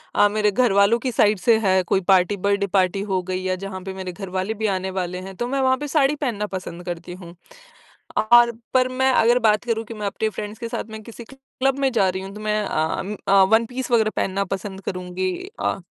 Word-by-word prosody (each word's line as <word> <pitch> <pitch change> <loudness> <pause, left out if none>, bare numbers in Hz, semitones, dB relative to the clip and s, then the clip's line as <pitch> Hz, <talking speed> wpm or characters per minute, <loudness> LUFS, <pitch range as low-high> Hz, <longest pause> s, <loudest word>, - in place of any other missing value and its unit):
अ, 205 - +6
मेरे 210 0 +1
घरवालों 215 0 +3
की 255 0 -2
साइड 210 -3 +3
से 225 +3 +4
है 190 -3 +3
कोई 190 +2 +1
पार्टी 190 +2 +3
बर्थडे 200 +1 0
पार्टी 190 0 +1
हो 185 -1 +1
गई 185 0 -3
या 185 0 0
जहाँ 190 -1 -6
पे 190 -1 -6
मेरे 190 -1 -6
घर 195 +1 -8
वाले 190 +4 -2
भी 220 0 -4
आने 190 +1 -4
वाले 180 -1 -3
हैं 190 - -9
तो 240 - -3
मैं 270 +1 -1
वहाँ 260 0 +3
पे 295 - -5
साड़ी 285 -1 +2
पहनना 235 -8 -2
पसंद 180 -2 -7
करती 175 0 -6
हूँ। 175 -2 -11 0.8
और 240 +2 +6 0.2
पर 255 0 +4
मैं 260 +1 +1
अगर, 240 +2 +4
बात 215 -2 +3
करूँ 225 -2 -1
कि 230 - -8
मैं 210 -1 -5
अपने 220 +2 -2
फ्रेंड्स 210 +1 -7
के 230 - -4
साथ - - -3
में 220 - -7
किसी 230 +1 -10
क्लब 270 0 -2
में 270 -1 +2
जा 195 -4 +3
रही 190 +1 -3
हूँ, 195 - -8
तो 215 - -8
मैं 215 0 0
अम्म, 190 +5 -2
अ, 195 0 +6
वन 225 +1 +5
पीस 255 0 -4
वग़ैरह 220 -2 +4
पहनना 195 +1 0
पसंद 195 0 -6
करूँगी 185 0 -3 0.3
अ, - - -1
205 Hz, 235 wpm, -22 LUFS, 190-235 Hz, 0.8 s, अ